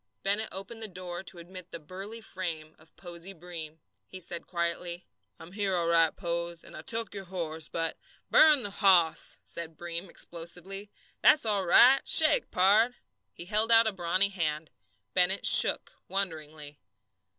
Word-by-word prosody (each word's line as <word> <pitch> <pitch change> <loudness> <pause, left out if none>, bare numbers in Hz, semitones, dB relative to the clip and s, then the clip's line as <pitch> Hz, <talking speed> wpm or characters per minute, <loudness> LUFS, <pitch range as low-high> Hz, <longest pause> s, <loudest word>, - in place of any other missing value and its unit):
Bennett 205 +3 0
opened 195 +5 -8
the 220 - -3
door 180 -2 -7
to 190 - -6
admit 180 +1 -11
the 170 - -8
burly 195 +8 -9
frame 165 -6 -6
of 155 0 -20
Posey 175 +1 -9
Breem. 165 -2 -9 0.3
He 185 - -10
said 170 -1 -7
quietly: 170 0 -4 0.3
"I'm 165 - -13
here 200 -1 -1
all 170 -1 0
right, 165 -1 +3
Pose, 170 -2 -4
and - - -13
I - - -8
took 225 +4 -2
your 195 -1 -7
horse, 160 -4 -3
but 165 -1 -3
" - - -32
"Burn 305 -4 +6
the 205 - -4
hoss!" 185 -5 +3
said 165 -2 -5
Breem 170 +2 -6
explosively. 180 +5 -5 0.3
"That's 295 - +5
all 200 -4 0
right. 260 +9 +6
Shake, 320 +10 +4
pard!" 215 +6 +3 0.4
He 170 - -10
held 215 +4 0
out 230 0 +6
a 220 - +1
brawny 185 +2 0
hand. 155 -5 -3 0.4
Bennett 185 +2 +1
"shook" - - +5
wonderingly. 155 -6 -5
180 Hz, 160 wpm, -28 LUFS, 170-200 Hz, 0.4 s, Burn